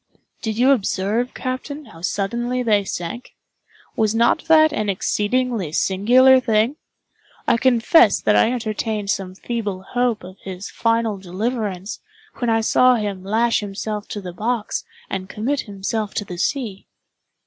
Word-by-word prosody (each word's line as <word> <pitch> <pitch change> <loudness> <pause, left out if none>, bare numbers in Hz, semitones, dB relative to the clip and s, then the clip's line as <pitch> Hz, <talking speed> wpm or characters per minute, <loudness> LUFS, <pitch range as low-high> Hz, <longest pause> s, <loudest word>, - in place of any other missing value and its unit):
"Did 220 -2 -3
you 255 +3 +5
observe, 220 0 0
captain, 280 +3 -5
how 165 -8 -14
suddenly 235 +7 -1
they 210 -3 +3
sank? 185 +6 -6 0.6
Was 220 0 +1
not 235 +6 +2
that 315 -1 +5
an 215 -1 -1
exceedingly 210 -1 0
singular 245 +10 +5
thing? 230 +3 +1 0.7
I - - +4
confess 260 +7 +4
that - - +2
I 225 - +4
entertained 215 -3 -2
some 185 -1 -3
feeble 205 -4 -4
hope 245 +1 -1
of 185 +1 -11
his 190 0 -7
final 230 -3 0
deliverance, 200 0 -3 0.4
when 240 - -1
I 225 0 +3
saw 255 +3 +4
him 205 -4 -3
lash 230 +4 +2
himself 210 +1 -5
to 205 - -5
the 180 -2 -7
box, 220 +3 -2 0.2
and 190 0 -5
commit 265 +6 -1
himself 205 +1 -3
to 205 - -2
the 180 -2 -7
sea." 225 -5 -2
220 Hz, 145 wpm, -21 LUFS, 195-245 Hz, 0.7 s, you